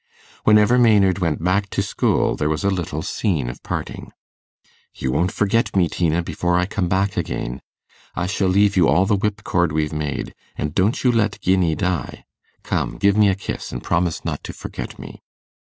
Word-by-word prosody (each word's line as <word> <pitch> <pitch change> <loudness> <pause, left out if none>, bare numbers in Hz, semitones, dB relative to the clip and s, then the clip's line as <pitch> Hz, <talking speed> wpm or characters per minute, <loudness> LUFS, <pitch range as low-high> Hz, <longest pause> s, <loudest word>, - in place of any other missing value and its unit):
Whenever 105 +3 +5
Maynard 100 -6 +4
went 80 -3 -1
back 95 +3 +1
to - - -1
school, - - +1
there 75 - -1
was 80 +5 -2
a 100 - +2
little 80 -4 -3
scene 90 - -1
of - - -14
parting. - - -5 0.8
'You 65 - -2
won't 85 +8 +1
forget 105 +2 0
me, 90 -3 +4
Tina, 85 0 0
before 90 +1 -1
I 90 - +2
come 95 -2 -2
back 95 +1 0
again? - - -3 0.5
I 90 - -1
shall 95 +1 0
leave 100 +2 +3
you 90 -3 +4
all 90 +6 +3
the 105 - +2
whip 105 +1 -2
cord 85 -2 +1
we've 75 0 -1
made; 75 -2 -3 0.2
and 75 0 -3
don't 100 +6 +1
you 125 - +4
let 110 -3 0
Guinea 90 -4 +2
die. 90 -1 -3 0.4
Come, - - -2
give 100 0 +3
me 105 -1 +5
a 95 - +1
kiss, 100 - -6
and - - -6
promise 85 -1 -1
not - - -3
to - - -6
forget - - -7
me. - - -11
95 Hz, 190 wpm, -21 LUFS, 85-100 Hz, 0.8 s, Whenever